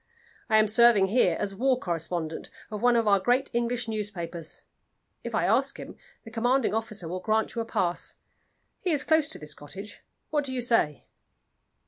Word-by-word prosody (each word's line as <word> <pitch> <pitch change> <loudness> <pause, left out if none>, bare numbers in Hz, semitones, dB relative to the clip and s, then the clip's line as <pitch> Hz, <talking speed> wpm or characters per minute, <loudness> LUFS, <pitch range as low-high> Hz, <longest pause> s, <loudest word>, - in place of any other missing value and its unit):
I 220 - +5
am 215 0 +5
serving 220 -3 +5
here 245 +5 +3
as 200 -1 -1
war 255 +5 +2
correspondent 165 -2 -3 0.2
of 210 -1 -5
one 245 0 +4
of 230 -2 +2
our 200 -1 +5
great 245 +7 +1
English 240 0 -1
newspapers. 185 -7 -5 0.6
If - - -4
I - - +1
ask - - +1
him, - - -9 0.3
the 225 - -11
commanding 245 +2 +1
officer 215 -5 -2
will 180 +3 -4
grant 220 +3 0
you 235 - -2
a - - -4
pass. 180 -5 -2 0.6
He 370 - -2
is 295 -5 +1
close 315 -2 +3
to - - -4
this 150 0 -6
cottage. 190 +10 -10 0.3
What 295 -1 +1
do 260 -1 -4
you 250 - -1
say?" 230 - +2
220 Hz, 180 wpm, -27 LUFS, 185-245 Hz, 0.6 s, I